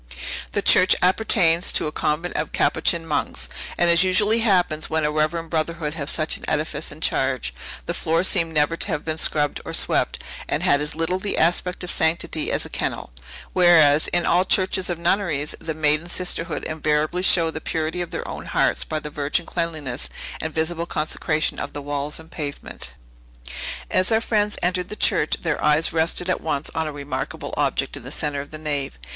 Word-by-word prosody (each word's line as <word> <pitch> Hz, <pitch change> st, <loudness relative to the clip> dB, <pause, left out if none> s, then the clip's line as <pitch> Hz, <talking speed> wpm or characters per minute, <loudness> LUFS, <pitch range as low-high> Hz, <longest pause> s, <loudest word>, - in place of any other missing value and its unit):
The -, -, 0 dB
church 185 Hz, -, +6 dB
appertains 180 Hz, -3 st, +3 dB
to -, -, +2 dB
a 150 Hz, -, -2 dB
convent 155 Hz, +4 st, -1 dB
of 150 Hz, -, -2 dB
Capuchin 165 Hz, +1 st, +1 dB
monks; 155 Hz, -, -2 dB, 0.3 s
and, 175 Hz, -, +3 dB
as 170 Hz, +1 st, +6 dB
usually 205 Hz, +5 st, +3 dB
happens 180 Hz, -8 st, +1 dB
when 160 Hz, 0 st, 0 dB
a 150 Hz, -, +1 dB
reverend 155 Hz, +2 st, -1 dB
brotherhood 160 Hz, -1 st, -1 dB
have 150 Hz, -3 st, -2 dB
such -, -, +1 dB
an -, -, -14 dB
edifice -, -, -2 dB
in -, -, -12 dB
charge, -, -, 0 dB, 0.3 s
the -, -, -2 dB
floor 165 Hz, +2 st, +1 dB
seemed 165 Hz, -3 st, +1 dB
never 150 Hz, +1 st, +2 dB
to 170 Hz, -, -2 dB
have 155 Hz, -6 st, -3 dB
been 160 Hz, 0 st, -2 dB
scrubbed 145 Hz, -2 st, 0 dB
or -, -, -7 dB
swept, -, -, +1 dB, 0.3 s
and -, -, 0 dB
had 140 Hz, -, +3 dB
as 150 Hz, +1 st, 0 dB
little 165 Hz, +3 st, -1 dB
the 200 Hz, +1 st, -2 dB
aspect 175 Hz, +2 st, +1 dB
of 180 Hz, -, 0 dB
sanctity 160 Hz, -1 st, +1 dB
as -, -, -1 dB
a -, -, -6 dB
kennel; -, -, -3 dB, 0.4 s
whereas, 160 Hz, -5 st, +5 dB
in 175 Hz, -1 st, +1 dB
all 175 Hz, +2 st, +3 dB
churches 185 Hz, 0 st, +1 dB
of 175 Hz, -, -2 dB
nunneries, 170 Hz, -4 st, 0 dB
the 160 Hz, -1 st, -4 dB
maiden 155 Hz, +2 st, +2 dB
sisterhood 175 Hz, -3 st, -1 dB
invariably 155 Hz, +2 st, 0 dB
show 170 Hz, -3 st, +4 dB
the 160 Hz, -, -6 dB
purity 160 Hz, +2 st, -2 dB
of 175 Hz, -, -4 dB
their -, -, -5 dB
own -, -, -7 dB
hearts -, -, +1 dB
by 155 Hz, -, -3 dB
the 150 Hz, 0 st, -7 dB
virgin 145 Hz, +4 st, -1 dB
cleanliness 155 Hz, -8 st, -3 dB, 0.3 s
and 160 Hz, -, -3 dB
visible 165 Hz, +1 st, -1 dB
consecration 155 Hz, 0 st, -1 dB
of -, -, -5 dB
the 145 Hz, -, -5 dB
walls 145 Hz, +1 st, -3 dB
and 160 Hz, +1 st, -14 dB
pavement. 145 Hz, -2 st, -6 dB, 1.0 s
As 185 Hz, +3 st, +2 dB
our 220 Hz, -, +4 dB
friends 210 Hz, -2 st, 0 dB
entered 180 Hz, 0 st, 0 dB
the -, -, -5 dB
church, 180 Hz, -8 st, +2 dB
their 160 Hz, -3 st, -1 dB
eyes 150 Hz, +2 st, +3 dB
rested 165 Hz, +2 st, +2 dB
at 185 Hz, -, 0 dB
once 150 Hz, -2 st, -2 dB
on 160 Hz, -1 st, -1 dB
a -, -, -3 dB
remarkable 140 Hz, -1 st, -5 dB
object 140 Hz, -1 st, 0 dB
in 145 Hz, -, -8 dB
the 125 Hz, +3 st, -9 dB
centre 145 Hz, -2 st, 0 dB
of 145 Hz, -, -11 dB
the 155 Hz, -, -8 dB
nave. 145 Hz, -, -3 dB
160 Hz, 195 wpm, -23 LUFS, 150-175 Hz, 1.0 s, church